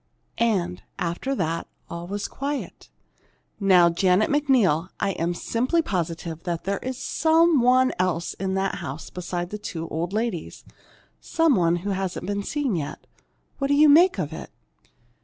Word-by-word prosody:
And 185 -6 0 0.2
after 180 +11 -2
that 165 -5 -2 0.2
all 170 0 -7
was 200 +2 -3
quiet. 280 +1 -5 0.7
Now, 180 -4 +5
Janet 185 +6 +2
McNeil, 240 - +2
I'm 175 -3 -1
simply 255 - 0
positive 170 - -3
there's 195 +9 -3
some 320 0 +3
one 255 +1 +4
else 175 -2 0
in 190 0 -3
that 195 0 -1
house 150 -1 -7
beside 175 0 -4
the 210 - -5
two 165 -5 -5
old 165 +3 -3
ladies, 215 -6 -3 0.5
some 325 -3 +2
one 170 -5 +3
who 205 - 0
hasn't 190 -1 -3
been 200 +1 -2
seen 275 0 -1
yet. 150 -4 -5 0.5
What 275 - 0
do 285 - +3
you 300 +1 +6
make 350 +6 +6
of - - -3
it?" - - -8
195 Hz, 145 wpm, -24 LUFS, 175-260 Hz, 0.7 s, you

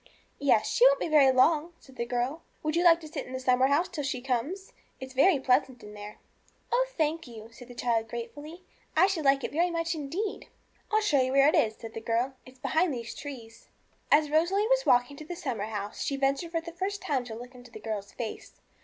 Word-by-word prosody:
'Yes, 260 -6 +3
she 475 - +2
won't - - +3
be - - -1
very 295 -4 +6
long,' 305 +6 +3
said 265 - -18
the 235 -1 -3
girl. 250 +6 -2 0.2
'Would 310 0 -1
you 345 - +2
like 335 -1 +6
to 315 - -9
sit 300 -3 -6
in 255 - -9
the 260 - -3
summer 255 0 +3
house 295 +6 +2
till 320 -5 -5
she 270 -2 -2
comes 265 +10 -3
I - - -27 0.3
it's 260 0 -8
very 280 +4 +4
pleasant 260 0 +2
there.' 210 0 -10 0.5
'Oh, - - +2
thank 320 -1 0
you,' 225 -2 -11
said 245 +1 -13
the 245 - -12
child 230 -2 0
gratefully; 290 +10 -8 0.3
'I 350 - +7
should 370 -6 -1
like 275 0 +4
it - - -3
very 340 +4 +1
much 335 0 -1
indeed.' 335 +8 -4 0.4
'I'll 435 0 +3
show 295 -10 +3
you 255 0 0
where 275 +1 +6
it - - 0
is,' 220 -1 +2
said 225 -1 -9
the 225 - -6
girl; 235 +4 0
'it's 255 0 -15
behind 320 +6 +1
these 235 -1 -6
trees.' 235 -6 -10 0.4
As 295 0 +4
Rosalie 350 +7 +2
was - - +2
walking 245 +3 +3
to 310 - -8
the 350 - -6
summer 255 - -3
house, 210 -1 -5
she 280 - -1
ventured 275 +4 0
for 330 -1 -2
the 335 +1 -8
first 385 +3 -3
time 270 -4 0
to 225 -2 -7
look 245 +3 -10
into 245 -1 -14
the 220 - -10
girl's 210 -2 -5
face. 230 -3 -7
275 Hz, 235 wpm, -28 LUFS, 245-330 Hz, 0.5 s, I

